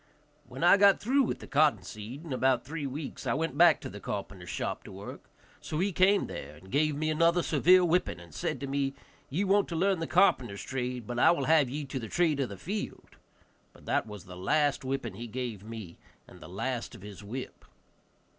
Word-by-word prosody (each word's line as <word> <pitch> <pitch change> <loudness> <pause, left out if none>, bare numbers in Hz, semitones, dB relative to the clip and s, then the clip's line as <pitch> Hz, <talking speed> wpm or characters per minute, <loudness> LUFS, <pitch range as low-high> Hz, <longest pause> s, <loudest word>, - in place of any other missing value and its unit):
When - - -6
I 175 - +7
had 200 - +7
got 200 -1 +6
through 265 +6 +2
with 255 - -1
the - - -8
cotton 145 - +3
seed, 110 - -8
in 150 - -4
about 130 -1 +2
three 150 -1 -4
weeks, 140 +2 -6
I - - +1
went 160 -2 -2
back 170 +3 +6
to - - -6
the - - -9
carpenter's - - -6
shop - - -3
to - - -10
work; - - -10 0.3
so 155 - -5
he 195 +4 +1
came 190 +3 +4
there 75 +2 -8
and 95 +5 -15
gave 150 +2 +2
me 155 +2 0
another 170 +2 +3
severe 180 +4 +5
whipping, 170 - +1
and 85 -3 -14
said - - -3
to - - -2
me, 135 0 -1 0.3
"Ye 170 +9 0
want 200 +1 +3
to 170 - -5
learn 190 +2 +2
the 165 - -3
carpenter's 130 - +2
trade, 125 -2 -3
but 120 +1 -4
I - - +6
will 170 - +2
have 155 -5 +4
ye 145 +3 -4
to 135 0 -4
the 115 - -6
trade 165 -5 +2
of 135 - 0
the 100 - -8
field." 200 - -6 0.6
But - - -18
that - - 0
was 105 -4 -9
the 90 - -10
last 145 +11 +1
whipping 130 -5 -3
he 115 +5 -7
gave 115 -4 -5
me, 110 -6 -9 0.3
and - - -15
the 80 - -11
last 120 +6 -3
of - - -13
his 105 -1 -10
whip. 125 +6 -7
140 Hz, 225 wpm, -29 LUFS, 115-170 Hz, 0.6 s, I